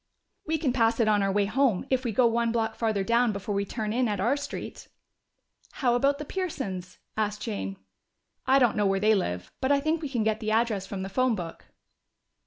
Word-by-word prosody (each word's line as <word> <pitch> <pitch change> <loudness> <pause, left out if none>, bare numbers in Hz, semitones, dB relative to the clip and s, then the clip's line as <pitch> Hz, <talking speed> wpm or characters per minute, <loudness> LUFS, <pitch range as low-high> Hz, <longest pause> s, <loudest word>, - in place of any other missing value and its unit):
"We 320 +1 +1
can 280 -5 0
pass 230 -2 +2
it 230 - +3
on 210 -1 +3
our 195 0 +1
way 205 +1 +2
home, 235 -1 +1
if 260 -1 +2
we 240 - -1
go 245 +4 +3
one 235 0 +2
block 225 -1 0
farther 220 -4 0
down 235 +2 +3
before 200 +1 -4
we 200 0 0
turn 215 +1 -3
in 250 +1 +2
at 205 -3 -2
our 235 +8 +2
street." 285 - -6 0.9
"How 245 -4 +1
about 275 +4 +2
the 300 - -6
Pearsons?" 265 - -4 0.2
asked 210 -1 -2
Jane. 95 -1 -4 0.7
"I 265 +1 +6
don't 245 -5 +3
know 205 -1 +2
where 195 0 +1
they 215 +2 +4
live. 90 - -2
But 260 - +1
I 285 - +4
think 310 +3 0
we 295 - -4
can 240 -5 0
get 220 0 0
the 215 - -3
address 220 -3 +1
from 190 -2 -4
the - - -4
phone 255 +4 +2
book." 170 -4 -7
225 Hz, 220 wpm, -27 LUFS, 200-255 Hz, 0.9 s, I